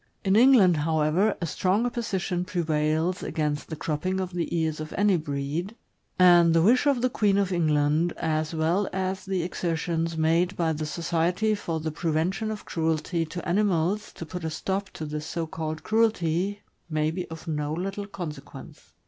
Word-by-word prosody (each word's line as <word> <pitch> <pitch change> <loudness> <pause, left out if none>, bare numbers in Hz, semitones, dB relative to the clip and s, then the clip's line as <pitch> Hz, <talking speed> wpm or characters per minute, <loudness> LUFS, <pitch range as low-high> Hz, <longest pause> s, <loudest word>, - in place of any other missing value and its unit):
In 190 +1 +3
England, 220 -8 +6
however, 160 +6 +1
a - - 0
strong 190 +7 +1
opposition 195 -7 -2
prevails 160 +1 0
against 150 -2 -2
the 160 - -4
cropping 165 +5 -2
of 185 -1 -3
the 175 -1 -2
ears 160 -1 -1
of 155 0 -6
any 205 -1 +4
breed, 155 +5 -3 0.4
and 175 -2 +6
the 165 - +5
wish 250 +8 +4
of 265 -4 +2
the - - +5
Queen 205 -4 +2
of 195 -1 +1
England, 155 -1 +2
as 155 -1 -1
well 170 +5 +1
as 190 0 -2
the 190 -3 -1
exertions 165 -1 -2
made 165 +4 +2
by 165 -2 +1
the 155 0 -3
Society 170 +6 0
for 170 -6 -3
the 160 0 -3
Prevention 170 +7 -1
of 215 -1 -6
Cruelty 165 +1 -1
to 175 +2 -7
Ani 180 +5 +2
mals 195 +1 0
to 165 - -7
put 180 +2 -7
a 160 - -1
stop 190 +5 -3
to 155 - -7
this 150 0 -5
so 165 -1 -3
called 155 0 -5
cruelty, 205 -3 +1 0.3
may 155 0 0
be 180 +2 -4
of 160 0 -9
no 150 -2 -2
little 195 +5 -3
consequence. 175 -7 -9
170 Hz, 175 wpm, -26 LUFS, 160-190 Hz, 0.4 s, England